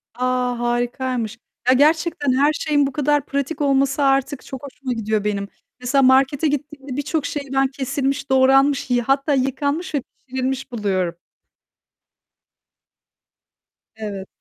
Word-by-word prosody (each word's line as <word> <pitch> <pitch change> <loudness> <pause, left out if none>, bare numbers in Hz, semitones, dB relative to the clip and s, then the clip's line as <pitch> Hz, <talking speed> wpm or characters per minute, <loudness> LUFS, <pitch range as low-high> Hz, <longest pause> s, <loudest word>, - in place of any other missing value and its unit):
A, 250 -1 0
harikaymış! 240 -1 -1 0.3
Ya, 255 - +7
gerçekten 300 0 +2
her 285 +4 +3
şeyin 290 -2 +1
bu - - -4
kadar 290 0 +1
pratik 280 +2 -3
olması 275 0 +2
artık 270 0 +1
çok 265 0 -8
hoşuma 265 -2 -5
gidiyor 215 -2 -1
benim. 200 -1 -1 0.3
Mesela 250 +3 +2
markete 270 +3 +4
gittiğimde 285 -2 -4
birçok 290 +1 -1
şeyi 285 -2 -4
ben 270 0 +3
kesilmiş, 270 +1 -2
doğranmış, 270 +1 +4
yı 245 -1 +2
hatta 275 +4 +1
yıkanmış 285 +5 -1
ve 280 - +1 0.2
pişirilmiş 260 0 -3
buluyorum. 190 -6 -1 2.8
Evet. 200 -3 -6
270 Hz, 125 wpm, -21 LUFS, 250-285 Hz, 2.8 s, Ya